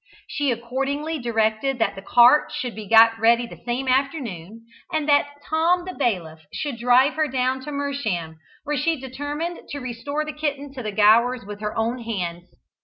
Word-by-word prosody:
She 290 Hz, -1 st, -1 dB
accordingly 275 Hz, +6 st, -2 dB
directed 230 Hz, +2 st, 0 dB
that 225 Hz, -4 st, +1 dB
the 195 Hz, -, -9 dB
cart 245 Hz, +8 st, +5 dB
should 250 Hz, -2 st, -4 dB
be 215 Hz, -2 st, -8 dB
got 225 Hz, +1 st, +6 dB
ready 235 Hz, +2 st, +4 dB
the -, -, -12 dB
same 245 Hz, +2 st, -2 dB
afternoon, 235 Hz, -, -2 dB, 0.3 s
and 310 Hz, -3 st, -1 dB
that 285 Hz, -1 st, +4 dB, 0.2 s
Tom 340 Hz, +3 st, +2 dB
the 370 Hz, -, -6 dB
Bailiff 180 Hz, -, -2 dB
should 280 Hz, -6 st, -4 dB
drive 250 Hz, +4 st, +4 dB
her 310 Hz, -1 st, 0 dB
down 260 Hz, -1 st, -1 dB
to 300 Hz, -, -5 dB
Mersham, 230 Hz, -, -3 dB, 0.3 s
where 295 Hz, 0 st, -2 dB
she 320 Hz, +3 st, 0 dB
determined 290 Hz, +6 st, -5 dB
to 285 Hz, -, -5 dB
restore 280 Hz, +4 st, -4 dB
the 305 Hz, -, -5 dB
kitten 285 Hz, -2 st, -4 dB
to 260 Hz, -, -6 dB
the 215 Hz, -3 st, -4 dB
Gowers 225 Hz, +4 st, +4 dB
with 205 Hz, 0 st, -8 dB
her 210 Hz, 0 st, -4 dB
own 230 Hz, +3 st, -1 dB
hands. 180 Hz, -7 st, -5 dB
255 Hz, 180 wpm, -23 LUFS, 225-285 Hz, 0.3 s, got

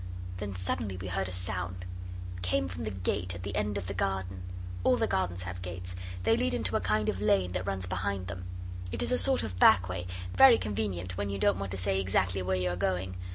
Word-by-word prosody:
Then 100 Hz, 0 st, -4 dB
suddenly 95 Hz, +1 st, -2 dB
we 95 Hz, 0 st, -5 dB
heard 95 Hz, 0 st, -1 dB
a -, -, -6 dB
sound 90 Hz, 0 st, -2 dB, 0.5 s
it 90 Hz, -, -8 dB
came 90 Hz, 0 st, +1 dB
from 90 Hz, -2 st, -5 dB
the -, -, -1 dB
gate 90 Hz, -2 st, -1 dB
at 90 Hz, -, -7 dB
the 100 Hz, -, -4 dB
end 105 Hz, -1 st, 0 dB
of 100 Hz, -, -3 dB
the 100 Hz, -, -3 dB
garden. 95 Hz, -1 st, -2 dB, 0.4 s
All -, -, +4 dB
the -, -, +2 dB
gardens 90 Hz, -1 st, -1 dB
have 90 Hz, 0 st, -6 dB
gates; 90 Hz, 0 st, -5 dB, 0.3 s
they 115 Hz, +3 st, +4 dB
lead 85 Hz, -4 st, +1 dB
into -, -, +1 dB
a -, -, +2 dB
kind 105 Hz, 0 st, +1 dB
of 95 Hz, -, -1 dB
lane 95 Hz, -3 st, +3 dB
that 90 Hz, +1 st, -3 dB
runs 95 Hz, -1 st, -1 dB
behind 95 Hz, +1 st, -2 dB
them. 90 Hz, -1 st, -6 dB, 0.5 s
It -, -, +1 dB
is -, -, +1 dB
a 250 Hz, -, +4 dB
sort 270 Hz, -1 st, +4 dB
of 95 Hz, -4 st, -5 dB
back 90 Hz, -3 st, +7 dB
way, 90 Hz, 0 st, -3 dB, 0.3 s
very 265 Hz, -3 st, +9 dB
convenient 95 Hz, -4 st, -2 dB
when 100 Hz, 0 st, -1 dB
you 100 Hz, -, -2 dB
don't 95 Hz, -1 st, +3 dB
want 100 Hz, -1 st, -3 dB
to -, -, -3 dB
say 95 Hz, +1 st, +1 dB
exactly 95 Hz, 0 st, +1 dB
where 95 Hz, 0 st, 0 dB
you 90 Hz, -1 st, 0 dB
are -, -, -2 dB
going. 95 Hz, 0 st, -1 dB
95 Hz, 240 wpm, -30 LUFS, 90-100 Hz, 0.5 s, very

